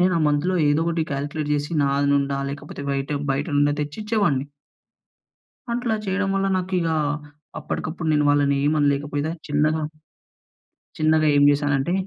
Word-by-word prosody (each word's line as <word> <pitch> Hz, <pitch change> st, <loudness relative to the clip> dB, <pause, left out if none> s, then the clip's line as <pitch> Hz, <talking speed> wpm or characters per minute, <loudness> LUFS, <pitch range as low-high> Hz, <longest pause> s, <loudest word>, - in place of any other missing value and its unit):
నేను 180 Hz, 0 st, +3 dB
ఆ -, -, -1 dB
మంత్‍లో 155 Hz, +6 st, +1 dB
ఏదోకటి 165 Hz, +2 st, +1 dB
కాలిక్లేట్ 145 Hz, +2 st, -3 dB
జేసి 145 Hz, +3 st, -2 dB
నాది 140 Hz, 0 st, +1 dB
నుండా 140 Hz, 0 st, 0 dB
లేకపోతే 145 Hz, 0 st, -7 dB
బయట 135 Hz, +1 st, -2 dB, 0.2 s
బయట 140 Hz, +2 st, -2 dB
నుండా 145 Hz, 0 st, +3 dB
తెచ్చిచ్చేవాడిని. 155 Hz, -4 st, -1 dB, 1.3 s
అట్లా 235 Hz, -2 st, 0 dB
చేయడం 195 Hz, +1 st, 0 dB
వల్ల, 195 Hz, 0 st, +1 dB
నాకిగా 180 Hz, -3 st, -1 dB, 0.6 s
అప్పటికప్పుడు 160 Hz, 0 st, -4 dB
నేను 150 Hz, -1 st, +3 dB
వాళ్ళని 145 Hz, -1 st, +3 dB
ఏమి 150 Hz, +2 st, +2 dB
అనలేకపోయినా 145 Hz, +1 st, 0 dB, 0.2 s
చిన్నగా 155 Hz, +2 st, +1 dB, 1.2 s
చిన్నగా 155 Hz, 0 st, +3 dB
ఏం 145 Hz, -, +5 dB
చేశానంటే, 145 Hz, +1 st, +1 dB
150 Hz, 130 wpm, -23 LUFS, 145-170 Hz, 1.3 s, ఏం